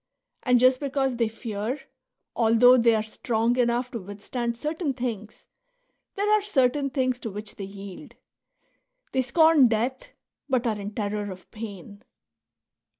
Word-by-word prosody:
And 250 -1 +3
just 255 +1 +5
because 270 -2 -1
they 230 -1 +2
fear, 225 +3 -4 0.6
although 230 +2 +6
they 230 -2 +4
are 215 - 0
strong 225 +1 0
enough 240 +1 +1
to 235 - -4
withstand 225 +5 -4
certain 305 +1 -2
things, 225 -4 -5 0.7
there 405 +1 0
are 425 0 +5
certain 275 -7 +1
things 255 -2 0
to 225 - -5
which 210 +1 -7
they 195 - -5
yield; 200 +6 -10 1.0
they 260 - +2
scorn 315 0 +5
death, 235 +4 -1 0.4
but 255 -2 +1
are 215 -3 0
in 205 +1 -6
terror 205 -1 -2
of 185 0 -12
pain. 205 -1 -9
235 Hz, 145 wpm, -26 LUFS, 215-260 Hz, 1.0 s, although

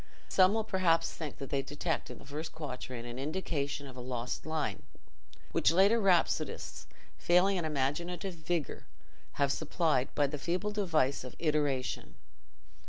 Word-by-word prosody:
Some 190 +2 +5
will 220 - +1
perhaps 185 -5 +2
think 155 -4 -6
that 135 - -7
they 140 - +2
detect 150 +4 -2
in - - -7
the - - -14
first 150 +3 -5
quatrain 130 -5 -6
an 120 +1 -6
indication 145 -2 -2
of 130 -2 -10
a - - -8
lost 125 +3 -4
line, 155 -2 -1 0.7
which - - +4
later 195 +6 +5
rhapsodists, 190 -5 +1 0.3
failing 185 +3 +4
in 170 - -1
imaginative 170 +6 -1
vigour, 165 -1 -3 0.5
have 140 -1 +2
supplied 150 -5 +1
by 145 - +4
the 145 +1 -3
feeble 180 +7 -1
device 160 -11 +1
of 130 - -8
iteration. 145 -5 0
155 Hz, 150 wpm, -32 LUFS, 140-180 Hz, 0.7 s, Some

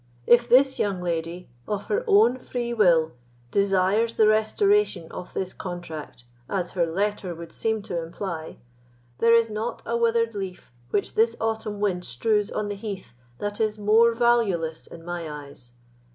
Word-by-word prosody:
If 240 0 +5
this 265 +2 +5
young 200 -3 0
lady, 170 0 -3 0.2
of 205 -1 -3
her 445 +4 0
own 400 - +5
free 240 -1 -4
will, 170 -8 +4 0.4
desires 200 +3 +2
the 220 - +5
restoration 220 - +2
of 180 - -8
this 185 -1 -3
contract, 170 -8 -7 0.3
as 185 -3 -2
her 175 -2 +1
letter 190 0 -2
would 165 0 -9
seem 220 +2 -1
to 175 -5 -3
imply, 165 -1 -6 0.6
there 230 0 +5
is 230 -1 +4
not 215 +3 -4
a 235 - -1
withered 230 -1 +2
leaf 190 -8 -6 0.2
which 200 - -1
this 230 +1 +3
autumn 220 -2 -2
wind 190 -4 0
strews 210 - 0
on 210 - -3
the 205 - -3
heath 200 - -7 0.2
that 205 +1 -4
is 215 -1 0
more 225 +3 +4
valueless 205 -10 +1
in 165 0 -12
my 175 -2 -4
eyes. 140 -5 -10
205 Hz, 160 wpm, -25 LUFS, 175-230 Hz, 0.6 s, If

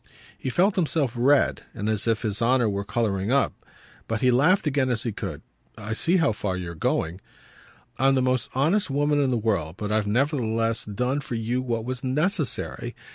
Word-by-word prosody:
He - - -4
felt 190 - +2
himself 155 -7 +1
red 130 +4 +3
and 105 -2 -3
as 110 0 -1
if 115 0 +1
his 105 -1 -2
honour 120 0 +3
were 100 -1 -1
colouring 100 -1 -1
up; 140 +1 +3 0.5
but 110 -1 -2
he 125 - +4
laughed 165 - +4
again 135 -3 +1
as 120 -1 0
he 120 - -2
could. - - -6 0.3
"I 110 0 -4
see 170 +11 +2
how 165 -9 +3
far 100 -3 -3
you're 90 -2 -5
going." 85 +2 -1 0.8
"I'm 135 +1 +4
the 130 - +2
most 130 -1 0
honest 160 +8 +2
woman 145 +1 +2
in 135 - +2
the 125 - +1
world, 100 -8 -1
but 105 0 -4
I've 105 -1 +1
nevertheless 115 -2 0
done 125 +7 -1
for 130 -4 -5
you 115 +3 -1
what 115 -3 -2
was 130 0 -4
necessary." 150 +3 -1
120 Hz, 190 wpm, -25 LUFS, 110-140 Hz, 0.8 s, he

